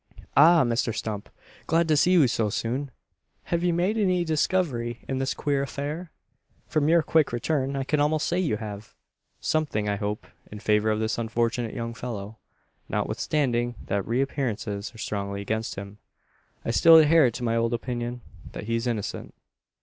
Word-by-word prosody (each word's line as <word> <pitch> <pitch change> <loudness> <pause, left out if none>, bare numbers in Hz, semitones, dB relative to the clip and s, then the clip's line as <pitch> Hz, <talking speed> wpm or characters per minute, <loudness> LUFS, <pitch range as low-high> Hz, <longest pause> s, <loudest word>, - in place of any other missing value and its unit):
"Ah! 165 +3 +7
Mr 115 -1 0
Stump! 105 -2 -4 0.4
Glad 165 +1 +2
to 155 - +3
see 180 +5 +4
you 160 -7 +6
so 115 -2 0
soon. 125 +7 -2 0.5
Have 170 0 -1
you 180 - +3
made 180 +6 +1
any 185 -4 +2
discovery 150 -7 0
in 130 -1 -2
this 135 0 -1
queer 140 -2 0
affair? 150 +5 -4 0.5
From 155 -1 +1
your 170 -1 +5
quick 160 -1 +2
return, 135 +2 -1
I 135 - -1
can 150 +2 0
almost 150 +1 +2
say 175 - 0
you 155 -13 0
have. 105 0 -8 0.4
Something, 145 -10 0
I 100 0 0
hope, 105 +1 -3 0.3
in 105 - -7
favour 105 +1 +2
of 110 0 +1
this 110 +1 -1
unfortunate 115 0 -1
young 115 -1 -4
fellow. 110 -3 -6 0.5
Notwithstanding 120 -5 0
that 100 0 -2
appearances 115 -5 -2
are 115 - -15
strongly 100 -2 -3
against 110 +2 -3
him, 100 +1 -8 0.7
I - - 0
still 165 +7 +7
adhere 155 -3 +6
to 120 - -7
my 115 -1 +1
old 115 0 +1
opinion 120 0 -4 0.3
that - - -6
he's 115 +2 -1
innocent. 110 -4 -4
120 Hz, 165 wpm, -26 LUFS, 110-155 Hz, 0.7 s, Ah